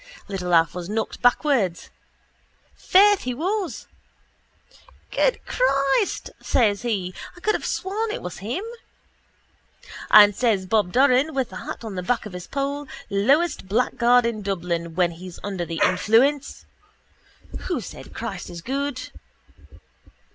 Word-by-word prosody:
Little 185 -3 -4
Alf 165 0 +4
was 180 0 -6
knocked 220 +1 -3
bawways. 245 - +1 0.8
Faith, 405 +1 +4
he 250 -1 -3
was. 375 - -2 1.3
—Good - - +1
Christ! 275 - +1
says 210 -5 +2
he. 200 -7 -2 0.2
I - - -11
could 430 +4 +1
have - - -3
sworn 420 +4 -2
it 425 - -5
was 180 - -6
him. 240 - -4 1.5
And 205 -1 +8
says 215 -6 +1
Bob 205 -2 +1
Doran, 270 - +3
with 265 -3 -1
the - - -7
hat - - -7
on 220 -3 -6
the 180 - -3
back 230 +6 -1
of 210 - -8
his 180 0 -8
poll, 280 +1 -3 0.2
lowest 265 - +2
blackguard 240 +3 +3
in 230 -2 -2
Dublin 170 -4 -3
when 180 -2 +2
he's 175 +1 -10
under 190 -4 -3
the 165 -1 -4
influence: 240 +10 +2 1.0
—Who - - -1
said - - -10
Christ - - -5
is 170 -1 -9
good? 275 +2 -3
230 Hz, 135 wpm, -23 LUFS, 185-280 Hz, 1.5 s, And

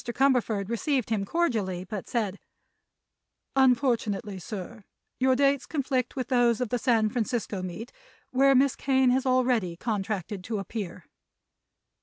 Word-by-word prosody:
Cumberford 240 -5 +1
received 235 +1 -1
him 205 -3 0
cordially, 215 - -1
but 200 0 -6
said: 210 -5 -1 1.2
"Unfortunately, 235 -6 +2
sir, 205 +4 -7 0.4
your 260 0 +4
dates 275 0 +2
conflict 265 -4 -1
with 255 -1 -3
those 240 -3 +3
of 250 -3 -1
the 245 - 0
San 225 -2 +3
Francisco 220 -4 -2
meet, 185 +6 -6 0.4
where 275 +1 +4
Miss 270 +1 +4
Kane 265 -2 +2
has 260 +1 +1
already 245 -9 +1
contracted 205 -2 -3
to 225 -2 -2
appear." 195 -3 -6
235 Hz, 130 wpm, -27 LUFS, 205-260 Hz, 1.2 s, your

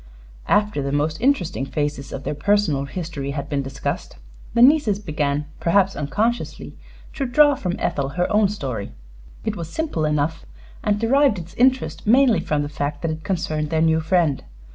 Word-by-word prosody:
After 210 -7 +2
the 140 0 -2
most 150 +6 -1
interesting 190 - +1
phases 145 0 -3
of 135 - -6
their - - -2
personal 165 -5 +1
history 150 -3 -5
had 140 - -3
been 140 -1 0
discussed, 135 0 -5 0.4
the 235 - +6
nieces 265 -7 +5
began, 150 -6 -2
perhaps 195 +3 +2
unconsciously, 220 +11 -2 0.4
to 275 -3 -2
draw 290 +4 +5
from 180 -9 -3
Ethel 135 -1 -1
her 175 +5 0
own 210 -2 +4
story. 130 - -5 0.5
It - - -1
was 165 -2 -6
simple 315 - -2
enough, 150 +2 0 0.4
and 205 -1 +1
derived 265 0 +3
its 170 0 -8
interest 260 -3 +1
mainly 245 -3 +5
from 150 -3 -1
the - - -3
fact 145 +1 -4
that 165 - 0
it 155 0 -6
concerned 155 -5 -2
their 160 - 0
new 160 0 +3
friend. 160 -3 +1
165 Hz, 170 wpm, -22 LUFS, 145-210 Hz, 0.5 s, the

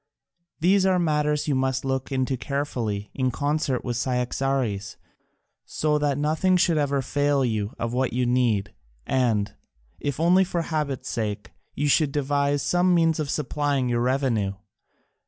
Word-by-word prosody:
These 185 +4 +4
are 185 -1 +3
matters 150 -3 +1
you 145 - +1
must 130 0 0
look 135 0 -2
into 130 0 0
carefully, 120 -7 -3
in 130 -1 0
concert 145 0 -1
with 120 -2 -2
Cyaxares, 125 -4 -1 0.7
so 150 -1 0
that 145 -2 0
nothing 155 +5 +2
should 170 -3 +2
ever 140 -2 0
fail 145 0 +1
you 110 -3 -2
of 115 0 -3
what 130 +1 0
you 125 +1 0
need, 120 -5 +1 0.3
and, 110 -6 +1 0.5
if 145 -1 -3
only 180 +3 +5
for 175 -2 -2
habit's 140 -5 -3
sake, 105 -4 -3 0.2
you 145 - 0
should 145 0 +3
devise 145 0 0
some 180 0 +3
means 165 -2 +3
for 155 - -1
supplying 145 -2 -1
your 120 -1 +1
revenue. 120 -6 0
135 Hz, 150 wpm, -25 LUFS, 125-150 Hz, 0.7 s, only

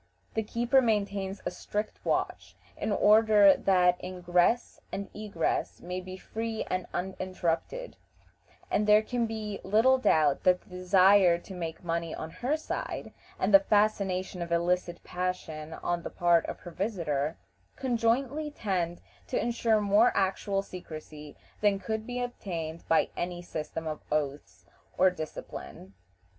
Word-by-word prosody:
The 220 - 0
keeper 240 +5 +2
maintains 200 -4 -1
a - - -1
strict 210 +1 -4
watch, - - -2 0.2
in - - -2
order 210 -1 +6
that 180 -2 +3
ingress 180 +5 +1
and 200 0 -5
egress 270 - -2
may 180 +1 -5
be 185 0 -8
free 225 +3 -4
and 185 -1 -1
uninterrupted, 185 - -3 0.7
and 210 - +1
there 210 +1 +6
can 235 0 -1
be 215 -2 -4
little 225 +7 +4
doubt 155 - +3
that 180 0 +3
the - - -24
desire 185 0 +5
to 180 +3 -11
make 165 -1 -5
money 170 -1 -2
on 160 - -6
her 255 - -1
side, 315 - -5 0.2
and 195 +2 0
the 195 - +11
fascination 195 -3 +1
of 170 0 -4
illicit 175 +1 0
passion 165 -4 -4
on 175 +1 -2
the - - -5
part 170 -1 +3
of - - -6
her 175 - -9
visitors, 165 -6 -1 0.4
conjointly 260 +4 0
tend 185 - -2 0.3
to - - -1
insure 230 -2 +2
more 205 +4 +5
actual 195 +1 0
secrecy 155 -5 -9 0.2
than 205 -2 +3
could 220 +3 -4
be 245 0 -3
obtained 170 -9 -4
by 165 - +3
any 175 0 -4
system 160 -1 -5
of 155 -1 -4
oaths 150 -1 -3 0.3
or 185 0 +5
discipline. 155 - -8
190 Hz, 140 wpm, -29 LUFS, 175-215 Hz, 0.7 s, the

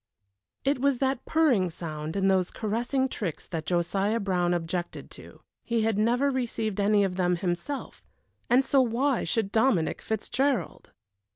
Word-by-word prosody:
It 275 0 +1
was 280 0 +2
that 265 0 0
purring 260 - +3
sound 155 -2 -6
and 195 -1 +2
those 185 -2 +2
caressing 240 +5 -1
tricks 200 - -5
that 160 -3 -5
Josiah 195 +5 +1
Brown 180 -4 0
objected 175 0 -3
to. - - -12 0.2
He 235 -2 0
had 220 -2 +1
never 245 +6 +2
received 230 -5 -2
any 205 0 +3
of 190 -2 -2
them 180 -1 +2
himself, 175 +10 -4 0.5
and 255 +2 +4
so 275 - +4
why 255 +2 +1
should 220 -4 -1
Dominic 220 -8 +2
Fitzgerald? 250 +5 -1
215 Hz, 150 wpm, -27 LUFS, 180-255 Hz, 0.5 s, and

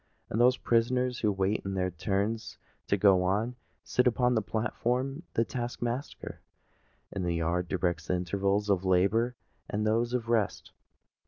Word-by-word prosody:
Those 120 +4 +4
prisoners 125 +2 +1
who 105 - +2
wait 95 +1 0
their 95 -1 -1
turns 100 +6 -2 0.3
to 100 - +2
go 95 -2 +5
on, 105 +7 0 0.3
sit 125 - +2
upon 125 0 +3
the 110 - +2
platform; 120 +5 -1
and - - -10
the 115 - +3
task 120 -1 -4
master 120 +4 -4 0.7
in 100 - -3
the 85 -1 0
yard 85 +2 0
directs 85 -4 -1
the 90 - +1
intervals 100 +3 0
of 95 -3 +2
labour 100 +7 +2 0.3
and 105 +1 -1
those 115 +3 +1
of 120 -2 -2
rest. 115 -4 0
105 Hz, 155 wpm, -29 LUFS, 95-120 Hz, 0.7 s, go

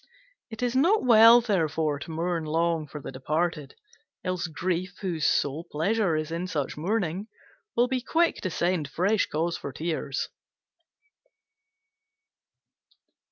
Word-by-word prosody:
It 220 +1 -6
is 245 0 0
not 350 +10 +3
well, 230 0 +8
therefore, 160 -8 0
to 145 - -8
mourn 165 +1 -2
long 165 0 0
for 150 - -8
the 140 - -7
departed; 150 +2 -2 0.5
else 185 -1 -2
Grief, 180 +3 -2
whose 170 -6 0
sole 145 +3 0
pleasure 185 +3 +1
is 155 +1 -3
in 170 +2 -3
such 145 -7 -3
mourning, 190 +2 -2 0.5
will 240 +1 +3
be 255 0 -1
quick 330 +6 +1
to 185 - -3
send 170 -2 0
fresh 200 +8 +1
cause 165 +2 -1
for 140 - -6
tears. 155 -1 -3
170 Hz, 130 wpm, -27 LUFS, 155-210 Hz, 0.5 s, well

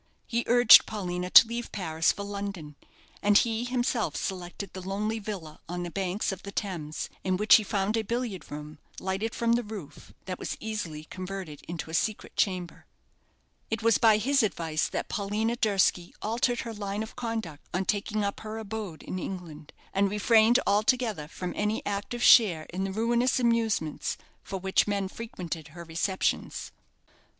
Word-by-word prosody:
He 235 0 -1
urged 240 -2 +8
Paulina 180 -4 -3
to 225 - +9
leave 235 +1 -4
Paris 165 -5 +1
for 200 - -6
London; 200 -7 -5 0.5
and 205 0 +5
he 230 0 +1
himself 245 -2 0
selected 185 0 -5
the 185 - -6
lonely 210 +4 -2
villa 190 -8 -7
on 175 0 -3
the 175 - -5
banks 195 +3 -1
of 190 -1 -6
the 200 - -8
Thames, 170 -8 -4 0.2
in 185 -1 +1
which 210 +2 +7
he 220 - -2
found 200 +1 0
a 225 - +2
billiard 230 -3 -3
room, 150 0 -8 0.2
lighted 195 +4 -2
from 235 0 +1
the 240 - +2
roof, 210 -9 -9
that 185 -1 -5
was - - -4
easily 210 -9 -4
converted 185 -3 -7
into 165 -2 -5
a - - -9
secret 215 +5 -1
chamber. 180 -3 -1 0.8
It 225 0 -2
was 230 -1 +4
by 220 -2 +6
his 270 +5 +2
advice 165 -7 0
that - - -3
Paulina 215 +2 -1
Durski 195 -6 +1
altered 240 +2 0
her 230 - -6
line 205 0 -3
of 220 - -10
conduct 225 -11 -4
on 185 +2 -1
taking 210 +1 -1
up 200 0 -2
her 220 0 -6
abode 215 -6 -6
in 185 - -4
England, 165 -6 -7 0.2
and 195 +1 +2
refrained 220 +3 +5
altogether 215 - +1
from 180 +3 -5
any 210 +1 -1
active 205 +4 -3
share 180 -10 +7
in 190 +2 -2
the 195 - -3
ruinous 235 +4 +2
amusements 225 -10 0 0.2
for 195 - -5
which 190 +2 +2
men 200 -2 0
frequented 180 -7 -6
her 170 +3 -10
receptions. 170 +3 -1
200 Hz, 170 wpm, -28 LUFS, 180-225 Hz, 0.8 s, to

